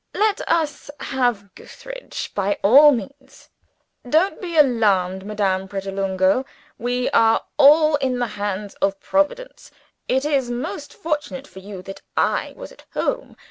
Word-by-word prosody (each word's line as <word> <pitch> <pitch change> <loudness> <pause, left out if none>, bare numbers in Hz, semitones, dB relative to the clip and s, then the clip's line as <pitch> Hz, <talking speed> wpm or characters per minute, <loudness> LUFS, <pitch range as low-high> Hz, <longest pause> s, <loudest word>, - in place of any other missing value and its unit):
Let 420 -1 +1
us 315 -4 -1
have 240 -7 -1
Gootheridge, - - -9
by 200 0 0
all 280 +8 +8
means. 270 +3 -7 0.6
Don't 325 +8 +2
be 345 -3 -4
alarmed, 200 -9 +2
Madame 195 -3 -1
Pratolungo. 195 +2 0 0.4
We 245 +1 -1
are 225 -4 +3
all 300 +1 +6
in 260 -3 -1
the 245 - 0
hands 205 0 -4
of 195 0 0
Providence. 295 +13 -2 0.4
It 265 +2 +1
is 275 -5 0
most 280 +4 -5
fortunate 295 -4 -4
for 190 - -12
you 190 -1 -9
that 195 +1 -9 0.2
I - - 0
was - - -9
at - - -17
home. - - -2
245 Hz, 140 wpm, -21 LUFS, 195-295 Hz, 0.6 s, all